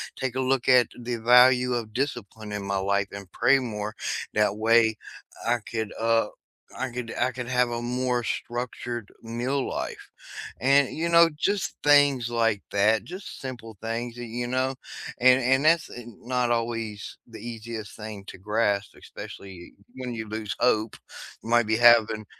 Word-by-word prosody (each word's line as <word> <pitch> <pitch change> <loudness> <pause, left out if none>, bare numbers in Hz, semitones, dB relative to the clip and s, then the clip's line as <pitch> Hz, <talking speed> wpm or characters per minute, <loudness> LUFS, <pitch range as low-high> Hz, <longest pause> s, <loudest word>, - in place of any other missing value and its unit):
take 130 -2 -3
a - - -1
look 130 -1 0
at 125 -3 +6
the 120 0 -3
value 125 +2 +5
of 110 -3 -4
discipline 115 -5 -4
in 105 -1 -4
my 100 0 -1
life 100 +1 0
and 100 -2 -9
pray 135 +1 +4
more, 105 -4 -4 0.4
that 105 -1 +2
way, 110 0 +4 0.5
I 120 +1 +3
could, 110 -2 -3
uh, 115 -1 +2 0.5
I 130 -1 -3
could 120 -1 -5
I 125 +1 +2
could 125 -1 -6
have 125 -1 +2
a 120 0 -3
more 125 0 -1
structured 120 -1 -4
meal 120 +4 -2
life. - - -5 0.5
And, 140 +1 +4
you 165 +2 0
know, 170 0 +6
just 200 +4 -1
things 145 -4 +4
like 115 -3 +1
that, 105 +2 +3
just 185 +3 -9
simple 120 -5 -8
things 115 +1 -4
that 120 0 -6
you 120 +1 -4
know? 130 +1 0 0.5
And 130 +1 +6
and 130 +3 +2
that's, 165 0 +4
uh, 120 - -8 0.2
not 125 0 0
always 115 -3 -3
the 115 -2 -11
easiest 115 -1 -7
thing 105 -2 -8
to - - -9
grasp, 105 0 0
especially 95 -3 -10 0.2
when 125 -1 -5
you 110 -1 -5
lose 110 -1 -4
hope, 110 -3 +2 0.5
you 115 - -8
might 120 -2 +4
be 110 0 +2
having, 115 -2 +5
120 Hz, 165 wpm, -26 LUFS, 110-125 Hz, 0.5 s, at